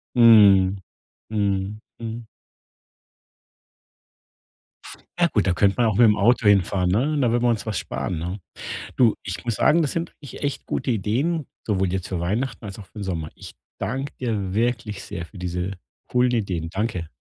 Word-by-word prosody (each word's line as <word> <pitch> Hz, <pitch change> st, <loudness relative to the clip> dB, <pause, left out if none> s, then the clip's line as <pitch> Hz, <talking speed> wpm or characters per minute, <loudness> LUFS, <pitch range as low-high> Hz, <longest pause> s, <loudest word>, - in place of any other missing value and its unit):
Mhm. 100 Hz, -5 st, +7 dB, 0.5 s
Mhm. 100 Hz, 0 st, -1 dB, 0.2 s
Mhm. 115 Hz, 0 st, -6 dB, 2.9 s
Ah 175 Hz, -1 st, +4 dB
gut, 105 Hz, -, +2 dB
da 95 Hz, -, +2 dB
könnte 100 Hz, +2 st, +3 dB
man 120 Hz, -, +3 dB
auch 110 Hz, -3 st, +1 dB
mit'm 110 Hz, -3 st, +6 dB
Auto 115 Hz, +1 st, +3 dB
hinfahren, 95 Hz, -2 st, +3 dB
ne? 135 Hz, +11 st, +1 dB
Da 120 Hz, -, +3 dB
würden 120 Hz, 0 st, +1 dB
wir 120 Hz, -, +4 dB
uns 115 Hz, -1 st, 0 dB
was 105 Hz, -, -1 dB
sparen, 70 Hz, +6 st, -3 dB
ne? 90 Hz, +5 st, -4 dB, 0.6 s
Du, 120 Hz, -4 st, +4 dB
ich 90 Hz, -3 st, -5 dB
muss 115 Hz, -3 st, -1 dB
sagen, 170 Hz, +2 st, +4 dB
das 145 Hz, -, 0 dB
sind 165 Hz, 0 st, -3 dB
wirklich 140 Hz, -, -10 dB
echt 140 Hz, -1 st, -3 dB
gute 130 Hz, -, -2 dB
Ideen, 130 Hz, -, 0 dB, 0.2 s
sowohl 95 Hz, -4 st, 0 dB
jetzt 95 Hz, -2 st, -2 dB
für 90 Hz, -3 st, -3 dB
Weihnachten 115 Hz, +8 st, -2 dB
als 100 Hz, +1 st, -7 dB
auch 100 Hz, -, -10 dB
für 105 Hz, -, -12 dB
'n -, -, -4 dB
Sommer. 85 Hz, -5 st, -3 dB
Ich -, -, -11 dB, 0.2 s
danke 135 Hz, +4 st, -3 dB
dir 105 Hz, -7 st, -2 dB
wirklich 115 Hz, -2 st, -1 dB
sehr 85 Hz, 0 st, -6 dB
für 100 Hz, -, -15 dB
diese 90 Hz, +2 st, -3 dB, 0.3 s
coolen 125 Hz, 0 st, +2 dB
Ideen. 90 Hz, -8 st, -1 dB
Danke. 95 Hz, -4 st, -2 dB
105 Hz, 170 wpm, -23 LUFS, 95-120 Hz, 2.9 s, Mhm